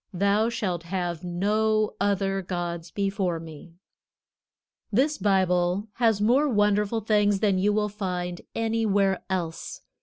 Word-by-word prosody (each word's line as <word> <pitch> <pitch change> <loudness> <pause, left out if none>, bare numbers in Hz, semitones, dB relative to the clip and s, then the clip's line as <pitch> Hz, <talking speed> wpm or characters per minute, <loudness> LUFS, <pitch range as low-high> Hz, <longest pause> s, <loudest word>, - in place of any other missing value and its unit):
Thou 200 +4 +2
shalt 185 -7 -2
have 175 -1 -3
no 215 +4 +1
other 195 -1 +1
gods 175 -2 -4
before 195 -2 -1
me." 160 +1 -11 1.2
This 285 +7 +1
Bible 185 0 +1
has 225 -4 +3
more 255 +8 +3
wonderful 210 0 +2
things 205 -2 +2
than 200 -3 +2
you 205 +2 +2
will 210 0 +1
find 180 -4 -4
anywhere 215 -4 +1
else. 170 -4 -4
200 Hz, 120 wpm, -26 LUFS, 180-215 Hz, 1.2 s, has